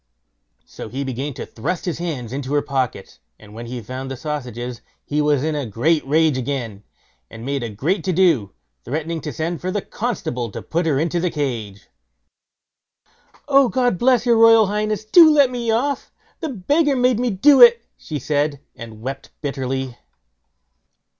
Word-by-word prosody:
So -, -, -9 dB
he 135 Hz, +3 st, -4 dB
began 135 Hz, +1 st, -4 dB
to -, -, -6 dB
thrust 170 Hz, +11 st, -4 dB
his 175 Hz, -3 st, -3 dB
hands 135 Hz, -9 st, -4 dB
into 140 Hz, +1 st, -3 dB
her 145 Hz, -, +2 dB
pockets, 130 Hz, -, -3 dB, 0.2 s
and 105 Hz, -1 st, -16 dB
when 115 Hz, +2 st, -8 dB
he 125 Hz, +1 st, -5 dB
found 130 Hz, +4 st, -6 dB
the 135 Hz, -, -5 dB
sausages 125 Hz, -5 st, -5 dB, 0.2 s
he 150 Hz, +1 st, 0 dB
was 145 Hz, -2 st, +2 dB
in 155 Hz, 0 st, 0 dB
a 145 Hz, -4 st, -3 dB
great 150 Hz, +10 st, +1 dB
rage 155 Hz, -2 st, +2 dB
again, 120 Hz, -6 st, -4 dB, 0.5 s
and 115 Hz, +1 st, -10 dB
made 140 Hz, 0 st, -2 dB
a 120 Hz, -, -4 dB
great 140 Hz, -, -1 dB
to 185 Hz, -, +1 dB
do, 160 Hz, -, +2 dB, 0.3 s
threatening 160 Hz, +4 st, -3 dB
to 150 Hz, -, -5 dB
send 160 Hz, +5 st, -3 dB
for 185 Hz, -, -3 dB
the 200 Hz, +1 st, -2 dB
constable 145 Hz, -, -3 dB
and -, -, -8 dB
put 170 Hz, +1 st, 0 dB
her 145 Hz, -4 st, +2 dB
into 165 Hz, +3 st, 0 dB
the 180 Hz, +1 st, 0 dB
cage. 120 Hz, -10 st, -4 dB, 1.6 s
"Oh, 275 Hz, -3 st, +5 dB
God 245 Hz, -8 st, +1 dB
bless 245 Hz, -2 st, +3 dB
your 235 Hz, -2 st, +4 dB
royal 225 Hz, -1 st, +7 dB
highness; 210 Hz, +1 st, -2 dB
do 325 Hz, +8 st, +8 dB
let 285 Hz, -4 st, +4 dB
me 240 Hz, -2 st, -3 dB
off! 260 Hz, +5 st, -1 dB, 0.3 s
The 320 Hz, -, -3 dB
beggar 285 Hz, -, +1 dB
made 250 Hz, -2 st, +2 dB
me 250 Hz, 0 st, +1 dB
do 260 Hz, +7 st, +5 dB
it", 235 Hz, -1 st, +8 dB
she 155 Hz, -, -6 dB
said, 145 Hz, +1 st, -1 dB, 0.2 s
and 115 Hz, -2 st, -10 dB
wept 135 Hz, +1 st, -6 dB
bitterly. 130 Hz, -2 st, -3 dB
150 Hz, 175 wpm, -21 LUFS, 130-215 Hz, 1.6 s, do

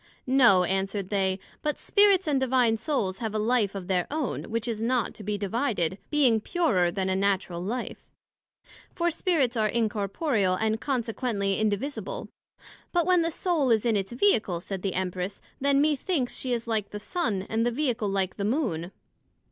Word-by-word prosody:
No, 245 Hz, -8 st, +5 dB
answered 195 Hz, +1 st, -1 dB
they; 190 Hz, -2 st, +1 dB, 0.2 s
but 300 Hz, -1 st, -1 dB
Spirits 405 Hz, -2 st, +4 dB
and 290 Hz, -4 st, +1 dB
Divine 255 Hz, -3 st, +3 dB
Souls 220 Hz, -6 st, -2 dB
have 220 Hz, -3 st, -3 dB
a -, -, +2 dB
life 215 Hz, -2 st, +1 dB
of 190 Hz, -2 st, -5 dB
their 180 Hz, -1 st, 0 dB
own, 300 Hz, -2 st, -2 dB
which 230 Hz, +1 st, -2 dB
is 225 Hz, -2 st, -3 dB
not 240 Hz, +1 st, 0 dB
to 215 Hz, -, -10 dB
be 210 Hz, +1 st, -2 dB
divided, 200 Hz, -, -1 dB
being 255 Hz, -7 st, +3 dB
purer 210 Hz, -, +1 dB
then 190 Hz, +2 st, -2 dB
a 190 Hz, -, +1 dB
natural 190 Hz, -3 st, 0 dB
life; 240 Hz, +6 st, -4 dB, 0.9 s
for 345 Hz, 0 st, +1 dB
Spirits 305 Hz, -8 st, +1 dB
are 215 Hz, -2 st, +2 dB
incorporeal, 210 Hz, -, 0 dB
and 220 Hz, +2 st, -1 dB
consequently 225 Hz, -6 st, -1 dB
indivisible. 260 Hz, -, -2 dB, 0.6 s
But 345 Hz, -2 st, +2 dB
when 365 Hz, -1 st, +4 dB
the 330 Hz, -, +1 dB
Soul 325 Hz, -5 st, 0 dB
is 225 Hz, -1 st, +3 dB
in 230 Hz, -2 st, +2 dB
its 195 Hz, +1 st, -1 dB
Vehicle, 235 Hz, -, +2 dB
said 190 Hz, +2 st, -6 dB
the 195 Hz, -1 st, -2 dB
Empress, 185 Hz, +1 st, -3 dB, 0.2 s
then 280 Hz, 0 st, +3 dB
methinks 295 Hz, -2 st, +1 dB
she 255 Hz, -, -2 dB
is 235 Hz, -1 st, -1 dB
like 220 Hz, -3 st, -1 dB
the 210 Hz, -, -6 dB
Sun, 205 Hz, -, -2 dB
and 225 Hz, +1 st, 0 dB
the 240 Hz, -, +2 dB
Vehicle 240 Hz, -5 st, -1 dB
like 195 Hz, -1 st, -1 dB
the 200 Hz, -, -2 dB
Moon. 205 Hz, -, -1 dB
225 Hz, 175 wpm, -27 LUFS, 195-270 Hz, 0.9 s, No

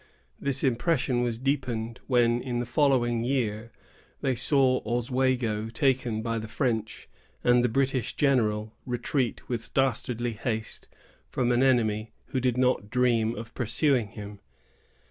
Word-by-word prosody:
This 140 Hz, -1 st, -1 dB
impression 130 Hz, -1 st, +1 dB
was 120 Hz, -2 st, -1 dB
deepened, 125 Hz, -4 st, -2 dB
when, 120 Hz, -2 st, +3 dB
in 125 Hz, -2 st, -3 dB
the 120 Hz, -, -1 dB
following 120 Hz, -4 st, +2 dB
year, 115 Hz, -3 st, -1 dB, 0.5 s
they 135 Hz, -, +1 dB
saw 130 Hz, +1 st, +2 dB
Oswego 120 Hz, -2 st, 0 dB
taken 120 Hz, -3 st, 0 dB
by 115 Hz, -1 st, -1 dB
the 110 Hz, -, -6 dB
French, 110 Hz, -3 st, -2 dB, 0.4 s
and 125 Hz, 0 st, +4 dB
the 125 Hz, -, +2 dB
British 130 Hz, 0 st, 0 dB
general, 115 Hz, -7 st, +2 dB
Webb, 110 Hz, 0 st, -15 dB, 0.2 s
retreat 120 Hz, +1 st, -1 dB
with 120 Hz, -2 st, -4 dB
dastardly 120 Hz, -2 st, 0 dB
haste 110 Hz, 0 st, -4 dB, 0.4 s
from 125 Hz, -2 st, 0 dB
an 120 Hz, +1 st, +3 dB
enemy 110 Hz, -4 st, +2 dB, 0.2 s
who 130 Hz, -, -1 dB
did 125 Hz, -1 st, 0 dB
not 125 Hz, -5 st, +1 dB
dream 115 Hz, -2 st, +2 dB
of 115 Hz, +1 st, -8 dB
pursuing 125 Hz, 0 st, +1 dB
him. 105 Hz, -1 st, -9 dB
120 Hz, 140 wpm, -27 LUFS, 115-130 Hz, 0.5 s, and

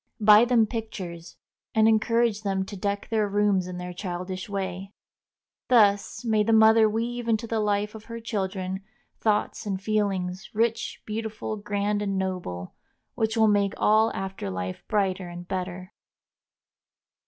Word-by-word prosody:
Buy 210 Hz, +1 st, +7 dB
them 240 Hz, -2 st, +4 dB
pictures, 195 Hz, -7 st, -6 dB, 0.4 s
and 220 Hz, 0 st, +5 dB
encourage 225 Hz, 0 st, +2 dB
them 195 Hz, -2 st, -1 dB
to 205 Hz, -, -8 dB
deck 200 Hz, +1 st, -3 dB
their 215 Hz, -2 st, +1 dB
rooms 200 Hz, -2 st, +2 dB
in 180 Hz, -1 st, -6 dB
their 180 Hz, 0 st, -6 dB
childish 185 Hz, +1 st, -5 dB
way. 195 Hz, 0 st, -4 dB, 0.7 s
Thus 220 Hz, 0 st, +3 dB
may 220 Hz, -2 st, +3 dB
the 220 Hz, +2 st, +1 dB
mother 220 Hz, 0 st, +6 dB
weave 235 Hz, +2 st, -3 dB
into 225 Hz, 0 st, +1 dB
the 225 Hz, -1 st, -1 dB
life 210 Hz, 0 st, 0 dB
of 220 Hz, -1 st, -10 dB
her 230 Hz, 0 st, -7 dB
children 190 Hz, -4 st, -3 dB, 0.4 s
thoughts 215 Hz, 0 st, 0 dB
and 195 Hz, -2 st, -2 dB
feelings, 195 Hz, -2 st, -1 dB
rich, 230 Hz, +1 st, -1 dB
beautiful, 220 Hz, 0 st, -4 dB
grand, 205 Hz, 0 st, -1 dB
and 195 Hz, -2 st, -1 dB
noble, 180 Hz, -, -4 dB, 0.4 s
which 220 Hz, +1 st, -1 dB
will 220 Hz, -1 st, +5 dB
make 200 Hz, -1 st, +2 dB
all 220 Hz, +1 st, +4 dB
after 190 Hz, -, -4 dB
life 95 Hz, 0 st, -5 dB
brighter 190 Hz, -3 st, 0 dB
and 175 Hz, 0 st, -9 dB
better. 185 Hz, +1 st, -5 dB
205 Hz, 145 wpm, -26 LUFS, 190-220 Hz, 0.7 s, Buy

